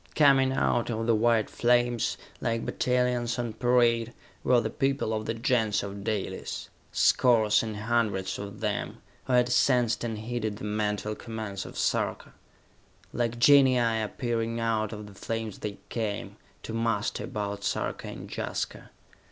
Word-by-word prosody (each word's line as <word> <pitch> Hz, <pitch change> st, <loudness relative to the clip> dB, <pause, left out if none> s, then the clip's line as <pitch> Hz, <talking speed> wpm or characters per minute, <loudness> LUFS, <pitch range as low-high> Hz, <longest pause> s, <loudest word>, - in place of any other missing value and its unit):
Coming 135 Hz, -3 st, +5 dB
out 130 Hz, -3 st, +1 dB
of 115 Hz, -1 st, -2 dB
the 115 Hz, -, +3 dB
white 115 Hz, 0 st, +3 dB
flames, 120 Hz, -1 st, +1 dB, 0.2 s
like 115 Hz, 0 st, -1 dB
battalions 125 Hz, -1 st, 0 dB
on 120 Hz, -2 st, -2 dB
parade, 120 Hz, -1 st, +2 dB, 0.3 s
were 125 Hz, -1 st, +4 dB
the 110 Hz, -1 st, -2 dB
people 135 Hz, -4 st, 0 dB
of 110 Hz, 0 st, -3 dB
the 115 Hz, -, -1 dB
Gens 115 Hz, -4 st, +1 dB
of 100 Hz, 0 st, -6 dB
Dalis 105 Hz, -3 st, -3 dB, 0.2 s
scores 110 Hz, -4 st, +4 dB
and 110 Hz, -2 st, -4 dB
hundreds 105 Hz, -4 st, 0 dB
of 100 Hz, 0 st, -7 dB
them, 105 Hz, -2 st, -2 dB, 0.3 s
who 130 Hz, -, -1 dB
had 125 Hz, 0 st, +4 dB
sensed 125 Hz, -2 st, +3 dB
and 115 Hz, -2 st, -2 dB
heeded 110 Hz, -1 st, -3 dB
the -, -, -10 dB
mental 105 Hz, 0 st, -1 dB
commands 110 Hz, -4 st, -6 dB
of -, -, -10 dB
Sarka. -, -, -1 dB, 0.8 s
Like 120 Hz, 0 st, -1 dB
genii 125 Hz, -4 st, +5 dB
appearing 115 Hz, +1 st, -2 dB
out 110 Hz, -2 st, 0 dB
of 105 Hz, -1 st, -7 dB
the 100 Hz, -, -12 dB
flames 110 Hz, +1 st, -4 dB
they 105 Hz, -1 st, -5 dB
came, 110 Hz, -3 st, -3 dB, 0.3 s
to 110 Hz, -, -6 dB
muster 115 Hz, -2 st, -1 dB
about 100 Hz, -1 st, -4 dB
Sarka -, -, -2 dB
and -, -, -7 dB
Jaska. -, -, -4 dB
115 Hz, 150 wpm, -28 LUFS, 105-120 Hz, 0.8 s, Coming